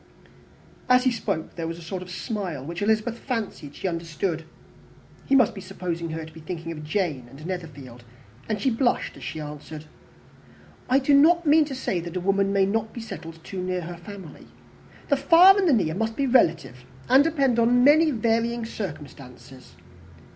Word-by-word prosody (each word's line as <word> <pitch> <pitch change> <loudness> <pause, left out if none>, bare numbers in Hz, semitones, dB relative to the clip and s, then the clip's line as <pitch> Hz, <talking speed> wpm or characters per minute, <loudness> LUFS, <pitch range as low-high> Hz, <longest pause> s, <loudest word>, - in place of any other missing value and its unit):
As 250 0 +5
he 255 - +3
spoke 160 -8 -3
there 165 -1 -3
was 165 0 -5
a - - -11
sort 180 +3 -5
of 180 - -9
smile, 185 - -4
which 170 +4 -6
Elizabeth 220 +2 0
fancied 210 - -5
she - - -3
understood; 165 -1 -3 0.8
he 275 - +3
must 250 -5 +4
be 195 - -8
supposing 175 -3 -5
her 160 0 -5
to 160 - -14
be 160 - -11
thinking 165 +1 -6
of 155 -2 -7
Jane 150 -6 -2
and 140 +5 -12
Netherfield, 145 -9 -7 0.5
and 215 -1 -1
she 260 +5 +1
blushed 240 +2 0
as - - -12
she 160 - -5
answered, 150 +1 -8 1.0
"I 260 - +5
do 280 +1 +2
not 335 +5 +5
mean 305 +1 +5
to 280 -2 -6
say 195 -8 -2
that 170 +1 -6
a - - 0
woman 195 +2 +1
may 195 -1 +3
not 220 +2 -2
be - - -7
settled 165 -7 -9
too 190 -2 -6
near 185 0 -2
her 175 +1 -7
family. 190 -2 -11 0.6
The 285 - +3
far 335 +7 +7
and 390 -4 +2
the - - +5
near 175 -9 +1
must 225 +4 -2
be 280 - 0
relative, 165 - +2 0.2
and 265 +2 +6
depend 275 -7 +1
on 245 +2 +4
many 310 +4 +6
varying 230 -1 0
circumstances. 140 - -9
195 Hz, 185 wpm, -25 LUFS, 165-245 Hz, 1.0 s, far